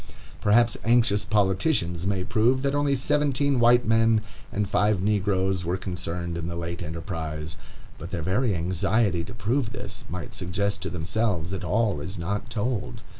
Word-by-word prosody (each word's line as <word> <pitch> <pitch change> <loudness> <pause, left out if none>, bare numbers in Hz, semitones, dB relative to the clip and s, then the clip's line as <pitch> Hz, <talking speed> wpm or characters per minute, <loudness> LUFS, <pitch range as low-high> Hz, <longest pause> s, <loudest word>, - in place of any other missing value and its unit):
Perhaps 115 +2 +4
anxious 115 -2 +3
politicians 95 - +1
may 95 -2 0
prove 120 +6 +2
that 140 0 +1
only 145 -1 +2
seventeen 140 0 +1
white 120 +1 +5
men 115 0 +3 0.3
and 105 0 -1
five 105 0 +2
negroes 95 -2 +1
were 85 +2 -1
concerned 85 -2 -4
in 85 - -4
the 85 - -4
late 85 +1 -4
enterprise, 80 -2 -5 0.4
but 85 - -7
their 85 -4 -3
very 100 +4 +1
anxiety 90 +2 +1
to 115 - -9
prove 115 +2 -1
this 125 - -6
might 90 +1 -6
suggest 100 +3 -2
to - - -3
themselves 90 0 -1
that 95 - -4
all 100 -2 +1
is 90 +6 -5
not 100 +7 -3
told. 115 +1 -3
100 Hz, 160 wpm, -26 LUFS, 90-115 Hz, 0.4 s, white